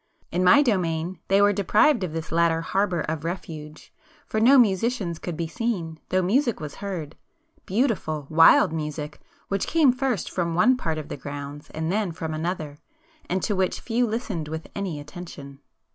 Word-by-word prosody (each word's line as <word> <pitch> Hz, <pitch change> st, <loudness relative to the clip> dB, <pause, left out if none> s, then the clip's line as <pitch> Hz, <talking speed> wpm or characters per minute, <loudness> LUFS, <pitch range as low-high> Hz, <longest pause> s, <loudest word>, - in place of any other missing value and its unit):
In 180 Hz, +2 st, 0 dB
my 185 Hz, +11 st, +7 dB
domain 175 Hz, -, -1 dB
they 195 Hz, +1 st, +4 dB
were 205 Hz, 0 st, +5 dB
deprived 210 Hz, -, +3 dB
of 180 Hz, -, -3 dB
this 160 Hz, 0 st, -5 dB
latter 165 Hz, 0 st, +2 dB
harbour 185 Hz, 0 st, 0 dB
of 155 Hz, 0 st, -3 dB
refuge, 160 Hz, -3 st, -7 dB, 0.3 s
for 220 Hz, -, -2 dB
no 255 Hz, +5 st, +6 dB
musicians 200 Hz, -5 st, +2 dB
could 175 Hz, -3 st, -5 dB
be 170 Hz, -, -1 dB
seen, 175 Hz, -5 st, -3 dB
though 185 Hz, 0 st, +2 dB
music 235 Hz, +5 st, +1 dB
was 150 Hz, -2 st, -7 dB
heard,—beautiful 200 Hz, -, -3 dB
wild 165 Hz, +2 st, +6 dB
music 150 Hz, -1 st, -4 dB, 0.3 s
which 195 Hz, -1 st, -1 dB
came 300 Hz, -6 st, +4 dB
first 255 Hz, -, -1 dB
from 170 Hz, -2 st, -1 dB
one 235 Hz, +9 st, +5 dB
part 165 Hz, -10 st, -2 dB
of 155 Hz, -2 st, -6 dB
the -, -, -5 dB
grounds 145 Hz, +1 st, -7 dB
and 160 Hz, +1 st, -3 dB
then 205 Hz, -2 st, 0 dB
from 160 Hz, 0 st, -4 dB
another, 155 Hz, -2 st, -4 dB, 0.5 s
and 185 Hz, +1 st, -1 dB
to 210 Hz, -, 0 dB
which 185 Hz, -1 st, 0 dB
few 240 Hz, +1 st, 0 dB
listened 210 Hz, -8 st, -3 dB
with 160 Hz, +1 st, -5 dB
any 190 Hz, -7 st, -3 dB
attention. 145 Hz, -3 st, -10 dB
175 Hz, 170 wpm, -25 LUFS, 160-210 Hz, 0.5 s, my